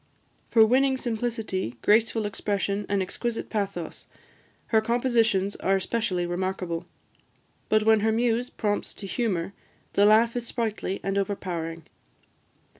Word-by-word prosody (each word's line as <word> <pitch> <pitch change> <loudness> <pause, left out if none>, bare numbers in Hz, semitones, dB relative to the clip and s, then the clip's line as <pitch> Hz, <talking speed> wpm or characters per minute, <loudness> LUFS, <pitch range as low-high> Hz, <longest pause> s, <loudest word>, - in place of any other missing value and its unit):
For 225 -1 +6
winning 265 +3 +3
simplicity, 225 - -3
graceful 225 0 +3
expression, 200 0 -2
and 200 -1 +1
exquisite 235 +5 -4
pathos, 195 -6 -3 0.6
her 220 -1 +4
compositions 230 -4 +1
are 195 - +1
especially 190 -2 -1
remarkable; 175 -1 -3 0.8
but 215 0 +4
when 220 0 +5
her 220 +1 +2
muse 235 +2 +1
prompts 205 -1 -2
to 200 - -7
humour, 195 -4 -1 0.4
the 200 +1 +5
laugh 225 +2 +5
is 240 -1 -3
sprightly 220 -5 -2
and 195 0 0
overpowering. 170 -4 -3
210 Hz, 120 wpm, -26 LUFS, 190-230 Hz, 0.8 s, For